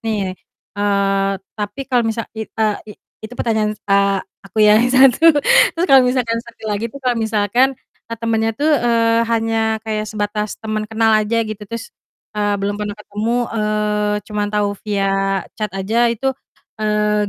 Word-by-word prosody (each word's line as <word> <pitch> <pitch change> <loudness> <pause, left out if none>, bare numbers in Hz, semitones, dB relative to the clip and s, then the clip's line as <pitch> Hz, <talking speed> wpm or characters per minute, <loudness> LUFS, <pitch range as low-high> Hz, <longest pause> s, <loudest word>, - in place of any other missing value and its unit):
nih, 210 -4 -2 0.4
eee, 200 -1 +1 0.2
tapi 210 +6 -5
kalau 250 -2 +1
misal 225 0 -2
i 220 -1 -6
e 220 - -1 0.2
i 210 - -7 0.3
itu 220 +2 -9
pertanyaan 215 -2 0
a 200 -1 +2 0.2
aku 210 +3 +2
yang 210 +1 +6
satu. 270 +5 +6 0.4
Terus 340 - +1
kalau 270 -6 +7
misalkan 245 -2 0
satu 235 -1 -16
lagi 215 +1 -2
tuh, 255 - -12
kalau 245 -1 +1
misalkan, 225 +4 +1 0.3
eee, 230 - -5
temannya 225 -1 0
tuh, 300 +3 +1
eee, 230 -3 +2
hanya 225 -1 +1
kayak 215 -1 -3
sebatas 210 0 -3
teman 215 -1 -4
kenal 220 0 +2
aja 215 +1 +2
gitu 215 -1 -6
terus, 230 - -7 0.4
eee, 205 -1 0
belum 200 +1 -3
pernah 205 0 -4
ketemu, 210 +2 -3 0.2
eee, 210 -1 0
cuma 210 0 -3
tahu 205 0 0
via 195 -2 0 0.2
chat 215 - 0
aja 225 +5 +1
itu, 235 +4 -1 0.5
eee, 210 -1 +1
215 Hz, 160 wpm, -18 LUFS, 210-230 Hz, 0.5 s, kalau